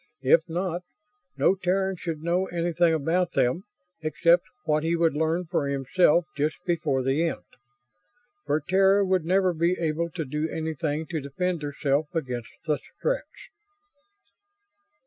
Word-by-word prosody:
If 140 Hz, +5 st, +6 dB
not, 175 Hz, +1 st, -2 dB, 0.6 s
no -, -, +4 dB
Terran 190 Hz, 0 st, 0 dB
should 165 Hz, -3 st, -5 dB
know 175 Hz, +3 st, +1 dB
anything 170 Hz, 0 st, +1 dB
about 170 Hz, +3 st, 0 dB
them 125 Hz, +10 st, +1 dB, 0.4 s
except 170 Hz, +2 st, +3 dB, 0.2 s
what 155 Hz, -1 st, +1 dB
he 165 Hz, +1 st, +1 dB
would 165 Hz, -2 st, +2 dB
learn 160 Hz, +4 st, 0 dB
for 160 Hz, -4 st, -1 dB
himself 150 Hz, +5 st, +3 dB
just 150 Hz, +2 st, 0 dB
before 155 Hz, -7 st, 0 dB
the 135 Hz, +5 st, +1 dB
end. -, -, -4 dB, 1.0 s
For 150 Hz, +1 st, +1 dB
Terra 195 Hz, +5 st, +4 dB
would 185 Hz, -3 st, +1 dB
never 185 Hz, +1 st, +3 dB
be 170 Hz, +3 st, +1 dB
able 165 Hz, +1 st, -1 dB
to 165 Hz, -1 st, -4 dB
do 150 Hz, +4 st, -2 dB
anything 155 Hz, -1 st, -2 dB
to 160 Hz, -3 st, -2 dB
defend 170 Hz, +5 st, -2 dB
herself 145 Hz, 0 st, 0 dB
against 125 Hz, -7 st, -3 dB, 0.2 s
the 150 Hz, -2 st, +1 dB, 0.2 s
Stretts. -, -, -3 dB
165 Hz, 140 wpm, -26 LUFS, 150-180 Hz, 1.0 s, If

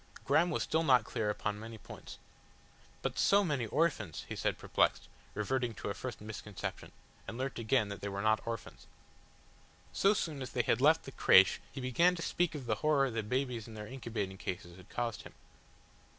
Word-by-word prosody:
Graham 175 Hz, +2 st, +4 dB
was 160 Hz, -, 0 dB
still 160 Hz, -, +1 dB
not 130 Hz, -6 st, +5 dB
clear 105 Hz, -2 st, -2 dB
upon 105 Hz, 0 st, -2 dB
many 115 Hz, +1 st, -8 dB
points. -, -, -10 dB, 0.9 s
"But -, -, -2 dB
so 200 Hz, +1 st, +5 dB
many 140 Hz, -, -1 dB
orphans," 125 Hz, -, 0 dB
he -, -, -5 dB
said -, -, -1 dB
perplexed, -, -, +1 dB, 0.3 s
reverting 120 Hz, +2 st, -1 dB
to -, -, -4 dB
a -, -, -2 dB
first 120 Hz, +1 st, -6 dB
misconception, 105 Hz, -2 st, -6 dB, 0.4 s
and 115 Hz, -, -6 dB
learnt 130 Hz, -1 st, -3 dB
again 115 Hz, -1 st, +2 dB
that 100 Hz, -, -6 dB
they 100 Hz, -, -3 dB
were 100 Hz, +1 st, -3 dB
not 110 Hz, 0 st, +3 dB
orphans. 115 Hz, -1 st, -6 dB, 1.1 s
So 200 Hz, +2 st, +4 dB
soon 160 Hz, -8 st, -2 dB
as 130 Hz, -, -6 dB
they 120 Hz, -, +2 dB
had 115 Hz, +1 st, +1 dB
left 155 Hz, +3 st, +5 dB
the 135 Hz, -, -8 dB
crèche 95 Hz, -6 st, +6 dB
he -, -, -7 dB
began 170 Hz, +9 st, +3 dB
to 165 Hz, -, -5 dB
speak 175 Hz, -3 st, 0 dB
of 140 Hz, -4 st, -6 dB
the 110 Hz, -2 st, 0 dB
horror 140 Hz, -3 st, +3 dB
the 115 Hz, 0 st, -1 dB
babies 125 Hz, 0 st, -2 dB
in 110 Hz, -, -10 dB
their 105 Hz, -1 st, -6 dB
incubating 105 Hz, -6 st, -4 dB
cases 90 Hz, -2 st, -5 dB
had 90 Hz, +1 st, -15 dB
caused 120 Hz, -2 st, -2 dB
him. -, -, -13 dB
120 Hz, 195 wpm, -33 LUFS, 105-140 Hz, 1.1 s, crèche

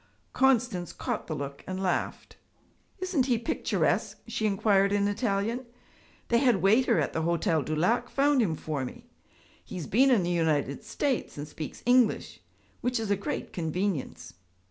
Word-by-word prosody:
Constance 245 Hz, -9 st, +2 dB
caught -, -, -4 dB
the 155 Hz, -, -3 dB
look 140 Hz, -1 st, -6 dB
and 185 Hz, 0 st, -4 dB
laughed. 185 Hz, -2 st, -2 dB, 0.6 s
'Isn't 365 Hz, -9 st, 0 dB
he 245 Hz, -3 st, +3 dB
picturesque?' 280 Hz, +8 st, 0 dB
she 220 Hz, -, -1 dB
inquired 200 Hz, -1 st, +3 dB
in 200 Hz, 0 st, +2 dB
Italian. 220 Hz, +3 st, -1 dB, 0.6 s
'The 235 Hz, -, +4 dB
head 250 Hz, -3 st, +4 dB
waiter 225 Hz, +5 st, +3 dB
at -, -, -1 dB
the 160 Hz, -, -1 dB
Hotel 165 Hz, -1 st, +1 dB
du 155 Hz, +2 st, -3 dB
Lac 180 Hz, +10 st, +1 dB
found 280 Hz, -1 st, +3 dB
him 175 Hz, -8 st, +1 dB
for 150 Hz, -3 st, -3 dB
me. 125 Hz, -, -9 dB, 0.5 s
He -, -, -9 dB
has 175 Hz, -4 st, -4 dB
been 260 Hz, -, +4 dB
in 230 Hz, -8 st, +4 dB
the 175 Hz, -, -1 dB
United 155 Hz, -4 st, 0 dB
States 245 Hz, -, -2 dB
and 145 Hz, +1 st, -5 dB
speaks 155 Hz, 0 st, -8 dB
English, 245 Hz, -, +2 dB, 0.4 s
which 245 Hz, 0 st, 0 dB
is 220 Hz, -2 st, -2 dB
a -, -, +4 dB
great 200 Hz, -, -4 dB
convenience.' 160 Hz, -, -3 dB
200 Hz, 165 wpm, -28 LUFS, 160-245 Hz, 0.6 s, The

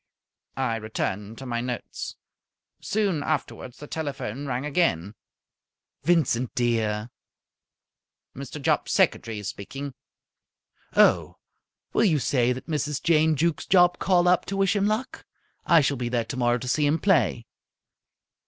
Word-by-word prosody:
I 125 Hz, -4 st, 0 dB
returned 110 Hz, -1 st, -4 dB
to 135 Hz, -, -8 dB
my 120 Hz, -2 st, -2 dB
notes. 125 Hz, -1 st, -5 dB, 0.6 s
Soon 200 Hz, -7 st, 0 dB
afterwards 145 Hz, -4 st, -3 dB
the 150 Hz, -, -9 dB
telephone 145 Hz, -4 st, -4 dB
rang 130 Hz, +1 st, -2 dB
again. 125 Hz, -, 0 dB, 0.9 s
"Vincent, 135 Hz, -6 st, +1 dB
dear?" 115 Hz, -2 st, 0 dB, 1.2 s
"Mr. 140 Hz, +2 st, -7 dB
Jopp's 150 Hz, +1 st, 0 dB
secretary 115 Hz, -, +1 dB
speaking." 135 Hz, +8 st, -6 dB, 1.0 s
"Oh, -, -, +4 dB, 0.6 s
will -, -, +3 dB
you 165 Hz, -7 st, +3 dB
say 125 Hz, -3 st, +1 dB
that 125 Hz, +1 st, -4 dB
Mrs. 150 Hz, -3 st, -2 dB
Jane 160 Hz, -1 st, +4 dB
Jukes 165 Hz, +2 st, 0 dB
Jopp 180 Hz, -1 st, +4 dB
called 180 Hz, -2 st, +3 dB
up 180 Hz, 0 st, +4 dB
to 195 Hz, -, -4 dB
wish 195 Hz, +1 st, +2 dB
him 200 Hz, 0 st, +2 dB
luck? 215 Hz, +5 st, -2 dB, 0.4 s
I 165 Hz, -2 st, +6 dB
shall 140 Hz, 0 st, 0 dB
be 120 Hz, -1 st, -2 dB
there 120 Hz, -2 st, 0 dB
tomorrow 120 Hz, -1 st, 0 dB
to 125 Hz, +1 st, -7 dB
see 145 Hz, +3 st, +2 dB
him 150 Hz, +3 st, +2 dB
play." 165 Hz, -, +2 dB
140 Hz, 135 wpm, -25 LUFS, 120-165 Hz, 1.2 s, I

